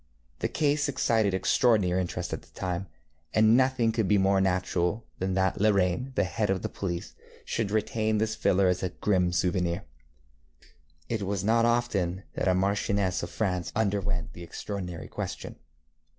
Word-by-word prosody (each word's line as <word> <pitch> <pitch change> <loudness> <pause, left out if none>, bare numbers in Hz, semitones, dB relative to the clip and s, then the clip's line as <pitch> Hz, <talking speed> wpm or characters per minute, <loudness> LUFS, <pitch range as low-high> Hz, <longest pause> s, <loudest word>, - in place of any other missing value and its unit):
The - - 0
case 145 -1 +1
excited 110 -7 +2
extraordinary 95 -2 +3
interest 90 - -4
at - - -4
the - - -21
time, 90 +1 -2 0.5
and 110 +1 +6
nothing 130 -3 +3
could 110 -3 0
be 105 - +4
more 95 0 +3
natural 95 +2 0
than 95 0 -1
that 95 0 +1
La 110 - +5
Reynie, 100 +6 +1
the - - +3
head 105 +2 -1
of 95 -1 0
the - - -2
police, 85 -3 -4 0.3
should 115 -3 -1
retain 110 +1 0
this 110 +1 0
filler 95 -2 +2
as 90 0 +1
a 95 - -1
grim 90 -2 +1
souvenir. 90 +1 0 1.2
It 115 -2 -2
was 100 -1 -2
not 115 +2 +3
often 100 -7 0
that - - -1
a 95 - +4
marchioness 100 0 +1
of 85 - -4
France 90 -5 -2
underwent 100 -4 -1
the 85 - -10
extraordinary 90 -1 -6
question. - - -6
100 Hz, 165 wpm, -28 LUFS, 90-110 Hz, 1.2 s, and